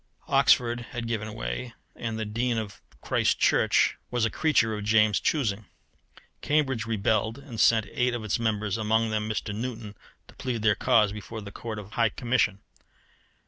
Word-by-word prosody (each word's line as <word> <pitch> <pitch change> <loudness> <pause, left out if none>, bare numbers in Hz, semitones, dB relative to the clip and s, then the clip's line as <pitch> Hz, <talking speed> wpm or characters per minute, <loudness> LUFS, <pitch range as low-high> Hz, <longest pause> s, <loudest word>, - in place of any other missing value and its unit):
Oxford 120 -1 +3
had 120 -1 -4
given 110 -2 -3
way, - - -5 0.2
and 115 -1 -4
the 110 - -3
Dean 115 +3 -1
of 110 -3 -5 0.2
Christ - - +1
Church - - +3
was 120 -2 +1
a 115 - -1
creature 130 -8 +2
of 105 -1 -4
James's 105 -1 +3
choosing. 110 -8 0 0.7
Cambridge 135 -6 0
rebelled, 110 0 0
and 135 -5 -9
sent 110 -2 +4
eight 125 0 0
of 115 - -5
its 110 +1 -1
members, 105 -2 -1
among 110 +1 +1
them 110 0 -1
Mr. 105 -1 -3
Newton, 110 -1 -5 0.3
to - - -16
plead 120 -4 -4
their 105 -1 +5
cause 105 -1 +3
before 105 +2 -7
the 100 -1 -9
Court 110 +1 -6
of 105 0 -9
High 115 -1 +2
Commission. 115 -4 0
110 Hz, 170 wpm, -27 LUFS, 105-120 Hz, 0.7 s, their